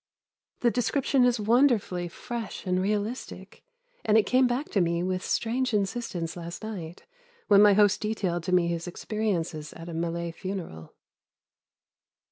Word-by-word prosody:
The 240 - +3
description 250 +2 +2
is 245 -2 +2
wonderfully 215 -6 +2
fresh 230 +6 -6
and 185 0 +1
realistic, 210 +5 -4 0.4
and 215 0 +4
it 220 - +4
came 255 0 +4
back 250 +5 -2
to 200 - +2
me 170 0 0
with 185 0 -2
strange 245 +1 0
insistence 195 -5 -2
last 170 +3 -7
night 180 -6 -7 0.4
when 200 -1 +7
my 210 -1 +7
host 205 0 +4
detailed 200 -5 -1
to 185 - -2
me 180 -1 +4
his 170 0 -2
experiences 175 -6 -3
at 165 +1 -9
a - - -6
Malay 170 +1 -2
funeral. 170 - -7
200 Hz, 145 wpm, -27 LUFS, 170-225 Hz, 0.4 s, when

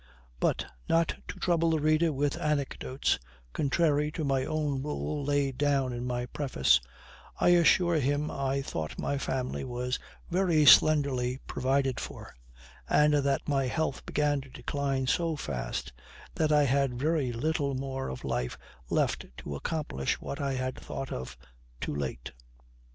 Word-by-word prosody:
But, - - +1 0.2
not 165 0 +3 0.2
to - - -6
trouble 170 -2 +2
the 160 -1 +2
reader 155 +2 +3
with 145 +1 0
anecdotes, 145 -4 0 0.3
contrary 150 0 +2
to 160 - -3
my 135 -2 +1
own 150 -4 -1
rule 150 0 -3
laid 140 -2 0
down 140 -3 +2
in 120 +1 -4
my 120 0 -1
preface, 125 - +2 0.6
I - - +4
assure 175 0 +5
him 145 +2 0
I 135 0 -1
thought 80 - -4
my 140 - -1
family 130 -2 -2
was 125 0 -2 0.3
very 170 -4 +3
slenderly 135 -5 +5
provided 135 0 0
for; - - -8 0.6
and 150 0 +5
that 140 -2 +1
my 135 -3 +1
health 155 +1 -1
began 145 -1 +1
to 135 - -13
decline 135 0 -2
so 165 +4 +1
fast 65 - -4 0.4
that 155 -1 +1
I 150 -1 +5
had 135 -2 +1
very 150 -3 +1
little 140 +3 -1
more 135 0 -3
of 65 - -7
life 60 0 -2 0.3
left - - 0
to 70 - -6
accomplish 70 - -2
what 140 - -5
I 140 -1 0
had 130 0 -3
thought 135 - -6
of 65 - -5 0.4
too - - -3
late. 65 -4 -4
140 Hz, 150 wpm, -29 LUFS, 130-150 Hz, 0.6 s, assure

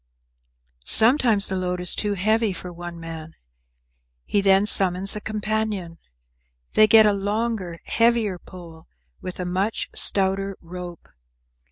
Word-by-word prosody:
Sometimes 225 - +5
the 190 - -3
load 180 -1 -3
is 180 0 +2
too 205 -1 -2
heavy 215 +2 0
for 180 -1 -8
one 175 0 -9
man. 165 -1 -10 0.9
He 205 - 0
then 195 0 +3
summons 195 -1 +4
a 210 - -6
companion. 215 -5 -4 0.7
They 215 - +5
get 220 0 +6
a 210 - +3
longer, 200 -3 -4
heavier 230 -5 0
pole, 170 -4 -14 0.3
with 185 - -8
a 180 - -4
much 190 +5 -3
stouter 195 0 -1
rope. 175 0 -10
195 Hz, 130 wpm, -22 LUFS, 180-215 Hz, 0.9 s, get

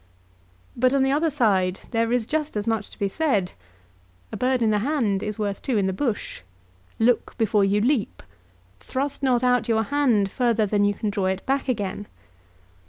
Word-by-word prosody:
But 255 +2 +2
on 270 - +3
the 270 - +2
other 310 +3 +2
side 195 -10 +1
there 230 -1 0
is 245 -2 +1
just 305 -2 -2
as 205 - -2
much 225 -1 -1
to - - -15
be 200 - 0
said. 205 - 0 0.8
"A - - -5
bird 255 -1 +1
in 220 - +3
the 210 - +2
hand 225 -6 0
is 210 -1 -4
worth 205 -2 -3
two 250 -5 -1
in 200 - +1
the 190 - 0
bush." 230 - -3 0.6
"Look 230 +1 +1
before 215 -3 +2
you 200 +1 +2
leap." 245 -2 0 0.6
"Thrust 275 +2 -3
not 255 -3 +2
out 250 0 +2
your 220 -1 +2
hand 230 -7 +1
further 235 -3 +1
than 205 0 +1
you 205 0 +1
can 210 +1 -2
draw 195 -2 -1
it 190 0 -2
back 270 +1 0
again." 205 -3 -3
225 Hz, 190 wpm, -24 LUFS, 205-260 Hz, 0.8 s, on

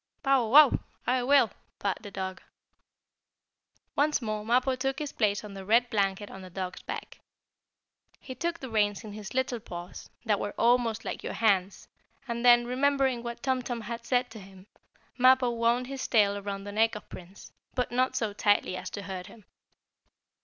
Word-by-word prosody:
"Bow 270 -4 +3
wow! 285 +4 +7 0.3
I 255 0 +2
will!" 260 -4 +4 0.3
barked 200 -2 -2
the 205 - -8
dog. 190 -1 -5 1.5
Once 300 +1 +2
more 215 -3 -3
Mappo 250 +4 +2
took 270 +1 -2
his 300 -2 -4
place 210 -2 0
on 210 -1 -9
the 195 -1 -8
red 235 +5 +3
blanket 200 -1 0
on 190 - -9
the 185 - -10
dog's 185 0 -5
back. - - -7 1.0
He 260 - -8
took 335 +6 -3
the 260 - -7
reins 205 -1 +1
in 210 -2 -8
his 210 +1 -8
little 260 -2 0
paws, 175 -4 -9 0.2
that 210 -3 +2
were 205 - -4
almost 235 -2 +2
like - - -4
your - - -5
hands, 195 -4 +1 0.4
and 235 0 -3
then, 240 -1 +6
remembering 265 0 +1
what 235 0 -7
Tum 260 -1 +1
Tum 245 -1 -4
had 235 +1 -6
said 245 0 0
to 225 - -9
him, 190 -1 -14 0.5
Mappo 255 -1 +5
wound 235 +1 +1
his 270 +1 -5
tail 205 -3 +3
around 200 -1 -5
the 205 - -7
neck 225 +2 +2
of 210 - -9
Prince, 185 +2 -12 0.2
but 250 -2 -1
not 255 +1 +1
so 220 -3 -1
tightly 205 -2 +2
as 185 0 -5
to 200 - -6
hurt 185 -1 -6
him. 215 -4 -15
230 Hz, 180 wpm, -28 LUFS, 200-255 Hz, 1.5 s, wow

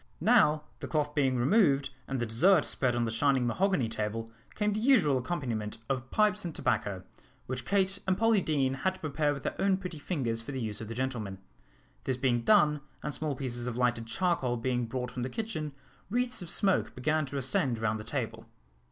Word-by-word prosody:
Now, 150 0 +4 0.2
the - - -5
cloth 150 -2 0
being 135 -4 +2
removed, 140 - +3 0.2
and 135 -1 -2
the 120 - 0
dessert 155 - +4
spread 125 -2 0
on 120 - +1
the 115 - -2
shining 130 +2 +2
mahogany 180 - +1
table, 110 +1 -3 0.2
came 210 -1 +1
the 210 - -1
usual 215 - +4
accompaniment 120 -7 -3
of 130 -1 -2
pipes 210 -1 +2
and 170 -3 -5
tobacco, 95 -2 -1 0.4
which 125 -1 -4
Kate 195 0 +1
and 185 -1 +2
Polly 225 -3 +3
Deane 140 -5 +1
had 185 +8 -1
to - - -15
prepare 150 -1 0
with 140 -1 -5
their - - -2
own 195 -1 +3
pretty 180 -5 -6
fingers 130 -8 -2
for 125 +5 -7
the 130 - -3
use 110 -1 -3
of 110 - -6
the 115 - -6
gentlemen. 120 -6 -3 0.7
This 130 - 0
being 125 -2 +1
done, 150 - +4 0.2
and 150 - -3
small 150 0 0
pieces 125 -2 -3
of 120 -1 -3
lighted 120 -2 +1
charcoal 130 -4 0
being 125 0 -1
brought 125 +1 -4
from 125 - -5
the 125 - -2
kitchen, 180 - -4 0.4
wreaths 245 +1 0
of 175 - -7
smoke 195 +1 +2
began 150 +3 0
to 140 - -5
ascend 130 -2 +1
round 110 -1 -1
the - - -6
table. - - -4
135 Hz, 205 wpm, -30 LUFS, 120-175 Hz, 0.7 s, Now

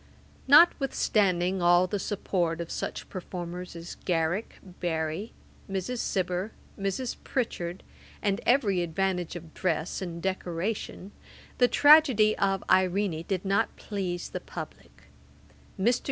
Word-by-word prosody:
Notwithstanding 205 - +4
all 175 +1 +5
the 200 +2 -2
support 180 -4 -1
of 170 -1 -5
such - - -4
performers 180 -1 -6
as 170 0 -8
Garrick, 175 +4 -1 0.2
Barry, 160 +4 -2 0.4
Mrs. 195 +6 -3
Cibber, 185 +1 -1 0.2
Mrs. 195 +6 -3
Pritchard, 180 -8 -3 0.4
and 200 +1 0
every 220 -8 +3
advantage 180 +1 -1
of 165 -2 -9
dress 165 -1 -1
and 170 -2 -5
decoration, 190 +2 -3 0.5
the 245 - +6
tragedy 275 -8 +6
of 195 -1 +1
Irene 185 -2 +2
did 190 -1 -2
not 195 +1 +1
please 185 -4 -4
the - - -4
publick. - - -10 0.8
Mr. 240 +6 +3
185 Hz, 115 wpm, -28 LUFS, 175-205 Hz, 0.8 s, the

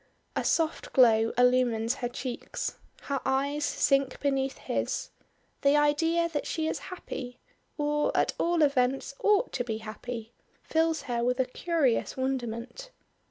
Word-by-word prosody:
A - - 0
soft 325 -1 0
glow 225 -3 +5
illumines 245 -2 +3
her 245 - -1
cheeks; 245 0 -5 0.2
her 280 -2 -2
eyes 280 +3 0
sink 275 -2 +1
beneath 270 -1 0
his; - - -2 0.5
the 280 +1 +4
idea 325 +3 +2
that 305 -4 -3
she 320 - -1
is - - -2
happy, 255 -9 -7 0.4
or 295 0 +1
at - - +2
all 340 -1 +2
events 270 -1 +1
ought 420 +4 +3
to - - -1
be 225 -3 -3
happy, 225 +1 -7 0.3
fills 320 0 +1
her 235 -2 -1
with 250 +1 +1
a 260 - +3
curious 275 -2 0
wonderment. 260 - -3
270 Hz, 140 wpm, -28 LUFS, 245-300 Hz, 0.5 s, glow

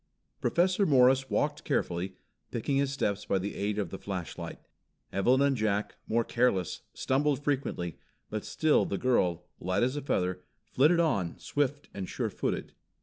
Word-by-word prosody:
Professor 185 +3 +3
Morris 130 -4 +5
walked 150 0 0
carefully, 90 +2 -1 0.3
picking 135 +4 -1
his 140 -1 +1
steps 105 -7 -1
by - - +1
the 100 +2 -3
aid 105 +1 -2
of 100 -5 -2
the 95 - -6
flashlight. 95 -4 -5 0.6
Evelyn 125 +8 +4
and 140 -1 +3
Jack, 105 -2 0
more 115 +1 +2
careless, 115 -8 +1
stumbled 140 +1 +1
frequently, 130 - -2 0.3
but 110 -1 -4
still 155 -1 +3
the 100 - -2
girl, 90 -9 +1
light 95 +4 0
as 130 +3 +1
a 145 - -2
feather, 90 -8 -1 0.2
flitted 155 +6 +4
on, 100 - +1
swift 145 0 -1
and 95 -2 -5
sure - - -2
footed. - - -3
120 Hz, 155 wpm, -30 LUFS, 95-140 Hz, 0.6 s, Morris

